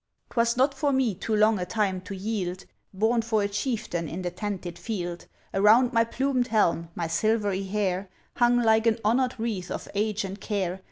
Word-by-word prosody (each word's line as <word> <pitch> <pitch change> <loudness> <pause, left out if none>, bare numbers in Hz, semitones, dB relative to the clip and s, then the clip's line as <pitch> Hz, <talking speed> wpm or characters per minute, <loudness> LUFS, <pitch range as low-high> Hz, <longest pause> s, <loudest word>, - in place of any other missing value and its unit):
'Twas 235 0 +1
not 270 +2 +3
for 290 -1 0
me, 260 -5 +2
too 215 +4 -2
long 215 -1 +4
a 180 - -2
time 195 -3 0
to 190 +2 -7
yield! 190 -2 -3 0.3
Born 220 +4 +2
for 220 -2 0
a - - +1
chieftain 205 - -2
in 185 +3 -5
the 175 - -2
tented 185 -2 -5
field! 175 -6 -4 0.3
Around 225 +6 +5
my 230 0 +5
plumed 255 +1 0
helm, 170 -7 +1
my 170 - -2
silvery 200 +2 0
hair 190 -1 -1 0.3
Hung 240 0 +4
like 220 0 +4
an 225 - +3
honour'd 250 +2 +1
wreath 210 -6 -3
of - - -5
age 210 0 0
and 195 +1 -7
care! 190 -4 -2
210 Hz, 185 wpm, -26 LUFS, 185-230 Hz, 0.3 s, Around